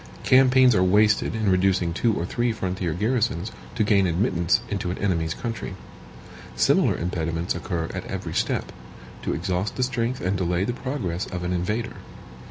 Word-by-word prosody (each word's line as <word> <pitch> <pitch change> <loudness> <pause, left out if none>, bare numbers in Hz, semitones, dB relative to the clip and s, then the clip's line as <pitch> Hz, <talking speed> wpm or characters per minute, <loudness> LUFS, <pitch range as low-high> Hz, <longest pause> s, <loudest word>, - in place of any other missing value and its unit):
Campaigns 130 -1 +6
are 90 - +3
wasted 105 +4 +3
in 110 -3 +1
reducing 95 -2 +2
two 115 +6 +1
or 85 - -2
three 120 +5 0
frontier 95 -5 -2
garrisons, 105 -1 0 0.2
to 115 - +2
gain 100 -3 +3
admittance 85 0 +1
into 100 -3 -3
an 90 - -3
enemy's 85 -5 0
country. 115 -5 -5 0.8
Similar - - +3
impediments 85 -1 -2
occur 85 -1 -3
at - - -5
every - - -5
step, - - -1 0.5
to - - -2
exhaust 95 +3 -2
the 130 - 0
strength 125 0 -1
and 95 +2 -1
delay 90 0 0
the 120 - -1
progress 120 -9 -3
of 90 -1 -5
an 90 +1 -1
invader. 105 +6 -2
95 Hz, 165 wpm, -24 LUFS, 90-115 Hz, 0.8 s, Campaigns